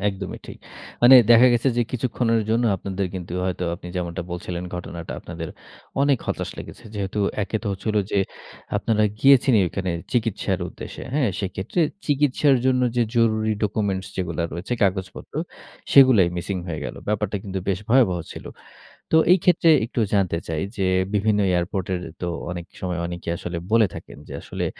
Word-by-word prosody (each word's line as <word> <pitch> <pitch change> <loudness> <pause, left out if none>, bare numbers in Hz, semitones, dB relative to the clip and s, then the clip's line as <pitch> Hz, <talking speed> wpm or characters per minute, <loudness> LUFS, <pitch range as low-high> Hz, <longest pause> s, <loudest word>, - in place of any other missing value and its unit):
একদমই 95 -1 -5
ঠিক। - - -9 0.5
মানে 125 +2 +9 0.2
দেখা 120 +2 +8
গেছে 120 +3 +2
যে 120 - +3
কিছুক্ষণের 115 -2 0
জন্য 115 +2 +2
আপনাদের 95 +1 -3
কিন্তু 90 -2 -6
হয়তো 90 -1 -2
আপনি 90 - -11
যেমনটা 85 -1 -3
বলছিলেন, 90 0 -4
ঘটনাটা 85 -1 -6
আপনাদের 85 -1 -7 0.5
অনেক 140 -4 +3
হতাশ - - -2
লেগেছে। 120 - -10
যেহেতু 100 0 -3 0.2
একে 110 - -2
তো - - -6
হচ্ছিল 105 +3 -3
যে 100 - +1 0.6
আপনারা 110 +1 +1 0.2
গিয়েছেনই 135 -5 +6
ওইখানে 95 +1 -3 0.2
চিকিৎসার 115 -4 0
উদ্দেশ্যে, - - -9
হ্যাঁ? 140 -7 +2
সেক্ষেত্রে 95 - -2 0.3
চিকিৎসার 145 -1 +3
জন্য 130 -1 +3
যে 120 - +4
জরুরি 110 -1 +2
ডকুমেন্টস 100 -2 -1
যেগুলা 85 -2 -2
রয়েছে 85 +8 -5
কাগজপত্র, 95 -1 -2 0.6
সেগুলাই 130 -10 +7
মিসিং 95 +2 -3
হয়ে 80 -2 -4
গেল। - - -5
ব্যাপারটা 105 -1 -1
কিন্তু 95 -1 -3
বেশ 95 - +1
ভয়াবহ 115 -8 +4
ছিল। - - -9 0.7
তো 160 - +4 0.2
এই 185 - +6
ক্ষেত্রে 175 -2 +4 0.2
একটু 120 0 -3
জানতে 90 -4 +1
চাই, 80 -1 -2
যে 95 - 0 0.3
বিভিন্ন 105 0 +2
এয়ারপোর্ট 90 +1 -1
এর 90 - -2 0.2
তো 90 - -1 0.2
অনেক 85 -1 -5 0.2
সময় 90 -1 -2
অনেকেই 85 -1 -4
আসলে 85 -1 -5 0.2
বলে 115 -2 +6
থাকেন - - -10
যে - - -9
আসলে - - -4
100 Hz, 160 wpm, -23 LUFS, 90-120 Hz, 0.7 s, মানে